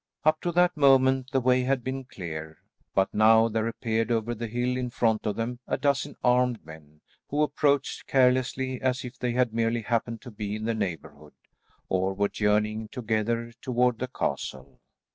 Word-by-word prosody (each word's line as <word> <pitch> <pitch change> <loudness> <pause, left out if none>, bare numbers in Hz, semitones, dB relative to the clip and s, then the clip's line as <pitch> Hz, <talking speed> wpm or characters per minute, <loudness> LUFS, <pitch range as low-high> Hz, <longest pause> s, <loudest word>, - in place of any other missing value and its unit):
Up 155 0 +3
to 175 - -1
that 180 +1 +3
moment 130 -2 +4
the 135 - +1
way 130 0 +3
had 130 0 0
been 130 +1 -4
clear, 80 -7 -7 0.4
but 95 0 +2
now 110 +1 +5
there 110 0 -1
appeared 115 -1 -1
over 115 0 0
the 115 0 -5
hill 120 +3 -1
in 125 -1 -2
front 115 -3 0
of 105 - -1
them 120 +2 -3
a - - 0
dozen 140 0 0
armed 125 -3 +2
men, 75 -1 -14 0.3
who 150 +2 +1
approached 145 -2 0
carelessly 130 0 +2
as 130 0 0
if 125 +1 -9
they 125 -1 -1
had 125 -2 +1
merely 115 0 0
happened 115 0 -1
to 125 - -9
be 105 -1 -4
in 110 0 -5
the 115 - 0
neighbourhood, 95 -7 -5 0.5
or 95 +1 0
were 100 +1 +1
journeying 105 +1 0
together 115 0 -2
toward 125 -2 +1
the 130 - -2
castle. 65 - -4
120 Hz, 180 wpm, -27 LUFS, 110-130 Hz, 0.5 s, now